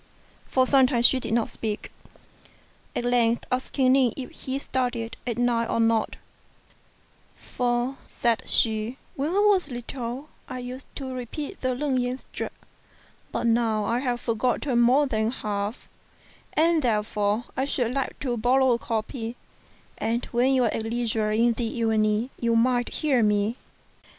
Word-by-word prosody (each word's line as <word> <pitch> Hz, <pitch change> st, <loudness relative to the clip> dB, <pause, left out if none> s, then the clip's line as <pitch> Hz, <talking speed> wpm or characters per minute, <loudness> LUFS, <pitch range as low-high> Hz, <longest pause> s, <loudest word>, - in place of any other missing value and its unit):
For 260 Hz, -1 st, +3 dB
some 265 Hz, -1 st, +5 dB
time 240 Hz, -3 st, +1 dB
she 260 Hz, +2 st, +7 dB
did 230 Hz, -, -5 dB
not 235 Hz, -2 st, +1 dB
speak: 215 Hz, -2 st, -4 dB, 1.0 s
at 240 Hz, -, -1 dB
length 240 Hz, -1 st, +2 dB
asking 255 Hz, +1 st, +1 dB
Ning 260 Hz, -3 st, +4 dB
if 265 Hz, -, -6 dB
he 265 Hz, 0 st, -4 dB
studied 245 Hz, -4 st, -2 dB
at 235 Hz, -, -2 dB
night 235 Hz, -1 st, +1 dB
or -, -, 0 dB
not 225 Hz, -1 st, +2 dB, 1.2 s
"For," 245 Hz, +2 st, -1 dB
said 235 Hz, -2 st, 0 dB
she, 220 Hz, +2 st, +2 dB, 0.2 s
"when 280 Hz, +3 st, -1 dB
I -, -, -2 dB
was 405 Hz, -6 st, +4 dB
little 245 Hz, +2 st, -6 dB, 0.2 s
I 255 Hz, -, -5 dB
used 250 Hz, +1 st, -7 dB
to 265 Hz, -2 st, -5 dB
repeat 270 Hz, -, -6 dB
the 255 Hz, -1 st, 0 dB
Leng 270 Hz, -1 st, 0 dB
yen 250 Hz, +1 st, -1 dB
sutra; -, -, -6 dB, 0.8 s
but -, -, -2 dB
now 225 Hz, -2 st, +2 dB
I 235 Hz, +3 st, +1 dB
have 245 Hz, -2 st, -1 dB
forgotten 240 Hz, +2 st, +1 dB
more 260 Hz, +5 st, +5 dB
than 220 Hz, -4 st, 0 dB
half, 210 Hz, -2 st, -4 dB, 0.7 s
and, 325 Hz, +1 st, +3 dB
therefore, 210 Hz, -2 st, 0 dB
I 265 Hz, -, 0 dB
should 250 Hz, -4 st, -1 dB
like 270 Hz, -1 st, -2 dB
to 250 Hz, -4 st, -1 dB
borrow 255 Hz, +3 st, +3 dB
a 235 Hz, -, +2 dB
copy, 225 Hz, +1 st, -3 dB, 0.6 s
and 230 Hz, +2 st, -1 dB
when 250 Hz, +2 st, +3 dB
you 255 Hz, -, +3 dB
are 230 Hz, -, +1 dB
at -, -, -2 dB
leisure 225 Hz, -1 st, -1 dB
in 230 Hz, +2 st, +3 dB
the 235 Hz, +1 st, -2 dB
evening 220 Hz, +1 st, +1 dB
you 235 Hz, -1 st, +1 dB
might 245 Hz, +1 st, +2 dB
hear 280 Hz, -6 st, +1 dB
me." 210 Hz, +1 st, +2 dB
240 Hz, 155 wpm, -26 LUFS, 225-260 Hz, 1.2 s, she